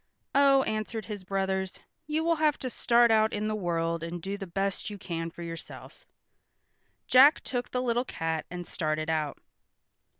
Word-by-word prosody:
"Oh," 275 -1 +5
answered 215 -1 -3
his 205 -1 -6
brothers, 190 0 -2 0.3
"you 310 +1 0
will 335 0 +2
have 305 -1 +2
to 255 - -5
start 235 0 +4
out 220 0 +4
in 210 +1 -1
the 215 - -1
world 170 -4 -1
and 170 +1 -5
do 195 +4 -4
the 200 -1 -7
best 195 +4 -2
you 205 - -7
can 165 -3 -4
for 170 +1 -9
yourself." 165 -1 -9 1.0
Jack 275 +5 +7
took 245 -1 -3
the 250 0 -1
little 240 0 +1
cat 160 -7 -3
and 175 0 -6
started 155 -1 -2
out. 155 -3 -1
200 Hz, 170 wpm, -28 LUFS, 170-240 Hz, 1.0 s, Jack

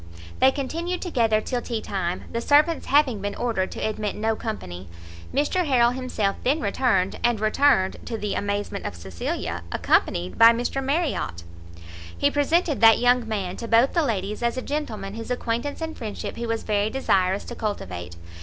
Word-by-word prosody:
They 260 - +6
continued 330 +7 -3
together 230 - +1
till 245 +2 -2
tea 230 -2 -3
time, 185 -4 -3
the 230 - -2
servants 300 +5 +3
having 270 -7 +3
been 205 0 -3
ordered 225 -6 -1
to - - -2
admit 215 -1 -3
no 220 +1 0
company. 95 - -6 0.4
Mr 295 +6 +1
Harrel 240 -3 +4
himself 250 -6 -2
then 280 +5 +2
returned, 200 -4 +1
and 240 -2 +2
returned, 215 -2 +3
to 230 - -4
the 210 -2 -3
amazement 200 0 -2
of - - -6
Cecilia, 85 -1 -4
accompanied 90 +1 +1
by 230 0 +9
Mr 245 +3 -2
Marriot. 275 - -1 0.7
He - - +2
presented 295 0 +1
that 225 -1 +8
young 245 -1 +3
man 195 -4 -3
to 230 - -6
both 230 +4 +4
the 340 - +3
ladies 210 - -2
as 235 +1 0
a 255 - -3
gentleman 220 -10 -4
whose 225 +2 -7
acquaintance 250 +4 -2
and 320 0 -4
friendship 215 -3 -6
he 235 0 -4
was 230 0 -2
very 210 0 +1
desirous 195 -7 +1
to - - -8
cultivate. 90 - -5
230 Hz, 175 wpm, -24 LUFS, 200-265 Hz, 0.7 s, by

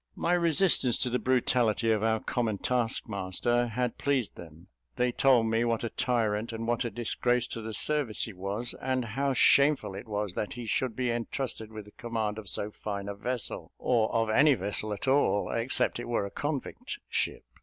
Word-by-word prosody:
My 170 - 0
resistance 170 -6 +4
to 125 - -1
the 125 - +1
brutality 120 -3 +2
of 110 -2 +2
our 110 0 +2
common 110 -3 -1
taskmaster 120 0 0
had 125 +1 -2
pleased 135 -7 0
them; 80 0 -12 0.3
they 125 0 +1
told 125 -2 +4
me 115 +1 +1
what 115 -1 0
a 115 - -2
tyrant 115 -3 0
and 115 0 -4
what 120 +2 +1
a 120 - -2
disgrace 120 +2 0
to 115 - -5
the 110 0 -5
service 145 -4 +1
he 110 - -5
was, 100 +6 -3
and 130 -1 0
how 135 +5 -1
shameful 140 -2 +4
it 100 +5 -8
was 105 -3 -2
that 105 - -3
he 120 -1 -7
should 115 +2 -1
be 125 -2 0
entrusted 115 -1 -4
with 110 -2 -8
the 105 - -15
command 110 -2 -3
of 105 -4 -5
so 105 +4 0
fine 100 -1 -5
a 100 - -3
vessel, 120 +4 -4
or 115 -3 +1
of 115 -1 +1
any 145 +5 +5
vessel 105 +1 -2
at 105 +5 -4
all, 130 -6 +2
except 115 +1 0
it 120 - -5
were 120 -4 0
a 100 - -7
convict 150 - -4
ship. - - -2
115 Hz, 195 wpm, -29 LUFS, 105-125 Hz, 0.3 s, any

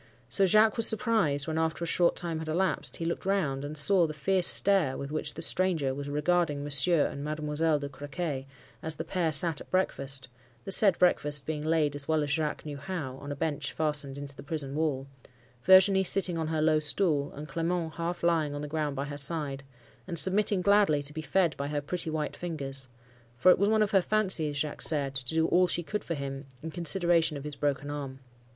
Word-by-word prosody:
So 190 +11 +2
Jacques 215 +4 +3
was 230 - +10
surprised 215 - +2
when, 160 0 -2
after 160 +1 -2
a - - -3
short 170 +1 +1
time 165 -2 -4
had 160 - -7
elapsed, 180 +4 -2
he 165 - -5
looked 170 - -4
round, 170 -9 -2
and 150 +2 -7
saw 175 +3 +3
the 155 - -8
fierce 185 +4 +1
stare 190 -10 +4
with 140 +1 -7
which 155 -1 -3
the 165 - -2
stranger 165 -7 +2
was 140 +1 -7
regarding 150 0 -1
Monsieur 145 +3 +2
and 140 - -6
Mademoiselle 155 +1 -1
de 145 -1 -6
Crequy, 140 0 -6 0.3
as 160 0 -2
the 160 - -5
pair 170 -1 -2
sat 155 +1 +5
at - - -13
breakfast,—the 130 -6 -4
said 195 -2 +6
breakfast 145 -5 +1
being 150 -1 -4
laid 155 -2 0
as 145 -1 -5
well 160 -1 0
as 145 - -4
Jacques 150 +1 -2
knew 145 -2 -7
how, 140 -3 -6
on 145 +1 -9
a - - -4
bench 145 -1 -3
fastened 150 -3 -2
into 140 -1 -9
the - - -11
prison 145 -2 -4
wall,—Virginie 140 +5 +1
sitting 185 -2 -1
on 160 -1 -3
her 155 -1 -2
low 155 -1 +2
stool, 150 -1 0
and 150 +2 -9
Clement 165 0 -3
half 170 +2 -5
lying 160 -4 0
on 145 - -6
the 150 - -6
ground 150 -1 -3
by 140 +1 -4
her 145 0 -4
side, 140 -2 +3 0.4
and 170 -2 -2
submitting 190 +1 +4
gladly 200 -8 +2
to 145 +1 -7
be 160 - -6
fed 165 +2 0
by 140 - -4
her 145 0 -3
pretty 165 +3 -4
white 155 -1 -4
fingers; 135 -6 -7 0.5
for 180 +9 +5
it - - +2
was 200 +1 +2
one 220 0 +2
of 205 - -3
her 195 - +3
fancies, 180 -8 -1
Jacques 150 0 -4
said, 140 -3 +2
to 130 +3 -3
do 160 0 +2
all 180 +1 +3
she 175 0 -1
could 210 +5 -5
for 165 - -4
him, 135 0 -7 0.2
in 160 - -6
consideration 170 -2 +2
of 140 - -9
his 150 -1 -7
broken 145 0 -3
arm. 140 -2 -7
155 Hz, 215 wpm, -27 LUFS, 145-175 Hz, 0.5 s, was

